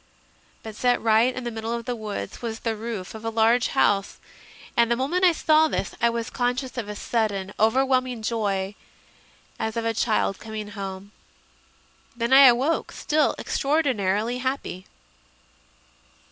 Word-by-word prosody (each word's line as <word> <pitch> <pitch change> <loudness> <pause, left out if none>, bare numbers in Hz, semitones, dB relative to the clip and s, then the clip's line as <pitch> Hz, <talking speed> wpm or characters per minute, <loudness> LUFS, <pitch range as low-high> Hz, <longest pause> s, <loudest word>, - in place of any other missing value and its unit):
But 220 -1 -8
set 245 +2 +2
right 225 +2 +3
in 255 0 -6
the 240 - -3
middle 225 +1 -4
of 235 -1 -6
the 245 - -2
woods 210 - -6
was 225 -2 -5
the 225 -1 -1
roof 215 -4 -6
of 220 0 -9
a 225 - -1
large 230 +2 +3
house, 200 -7 +1 0.6
and 235 -1 +3
the 235 - +3
moment 290 +9 -1
I 360 - +7
saw 315 -1 +3
this 250 - -3
I 235 - +4
was 230 0 -3
conscious 250 +1 -2
of 230 -5 -4
a 210 - -5
sudden 205 -4 -2
overwhelming 255 +1 +2
joy, 200 -4 -1 0.9
as 220 +1 -3
of 230 - -2
a 230 - +1
child 215 -3 0
coming 215 -2 -6
home. 195 -1 -7 1.0
Then 235 +2 0
I 270 0 +10
awoke, 260 +7 +2
still 305 0 +1
extraor 300 +4 0
dinarily 220 -1 0
happy. 260 -8 -4
230 Hz, 160 wpm, -24 LUFS, 215-255 Hz, 1.0 s, I